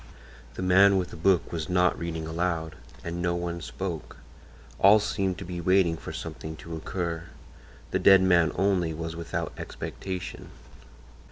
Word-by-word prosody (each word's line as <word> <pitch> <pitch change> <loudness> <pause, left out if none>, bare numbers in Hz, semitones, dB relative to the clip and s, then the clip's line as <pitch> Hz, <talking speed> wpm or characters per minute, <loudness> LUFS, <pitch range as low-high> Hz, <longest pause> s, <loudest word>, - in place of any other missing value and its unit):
The - - -4
man 95 +2 +6
with 90 -1 -2
the - - -8
book 90 +2 +2
was 80 -3 -4
not 90 0 +3
reading 80 -1 -4
aloud, 80 -1 -2 0.3
and 85 +1 -4
no 85 0 +1
one 85 0 -3
spoke; 90 -2 -5 0.6
all 100 +3 +8
seemed 100 -3 -1
to - - -7
be 90 0 -5
waiting 90 -1 +3
for - - -8
something 80 0 -6
to 80 +1 -8
occur; 85 0 -4 0.7
the - - +1
dead 95 -1 +7
man 85 -4 +4
only 90 -5 +1
was 80 +1 -5
without 85 0 -4
expectation. 95 -2 -6
85 Hz, 155 wpm, -27 LUFS, 80-95 Hz, 0.7 s, all